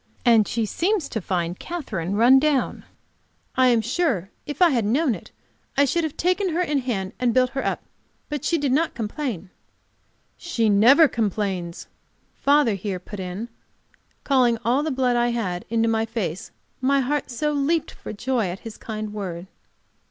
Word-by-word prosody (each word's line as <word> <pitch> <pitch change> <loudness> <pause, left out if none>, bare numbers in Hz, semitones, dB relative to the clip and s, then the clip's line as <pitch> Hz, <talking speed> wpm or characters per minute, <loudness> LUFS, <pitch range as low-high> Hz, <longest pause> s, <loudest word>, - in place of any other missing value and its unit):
And 225 -3 +5
she 230 -1 -1
seems 355 - 0
to 220 - -3
find 175 -1 -2
Katherine 200 - -4
run 245 +5 +6
down. 290 -2 0 0.7
I 255 0 +5
am 235 -2 +4
sure 235 - -1 0.2
if 290 - -5
I 355 -3 +6
had 240 -4 +1
known 255 +6 +2
it - - -9 0.5
I 280 - +5
should 330 +5 0
have 315 -2 -4
taken 365 +2 +1
her 355 - +2
in 300 -5 +1
hand 210 -8 -3
and 245 -2 +1
built 255 0 +3
her 270 - -3
up. - - -2 0.4
But 295 -3 -4
she 335 - +1
did 285 -4 0
not 315 +5 +1
complain." 215 - -4 0.9
"She 230 -11 0
never 245 +11 +7
complains," 195 -7 -2 0.5
father 285 -5 +3
here 195 -1 -3
put 195 +3 -9
in, 185 +5 -5 0.8
calling 250 -4 +3
all 250 +5 +3
the 315 - -1
blood 255 -3 +1
I 240 0 +2
had 205 -7 -2
into 230 0 +1
my 225 0 +1
face, 205 -7 -4 0.3
my 275 +1 +3
heart 285 +2 -1
so 300 +5 -1
leaped 295 +3 0
for - - -9
joy 235 0 -1
at 180 +2 -6
his 225 -2 -9
kind 215 -1 -5
word. 185 -4 -5
240 Hz, 175 wpm, -23 LUFS, 210-285 Hz, 0.9 s, never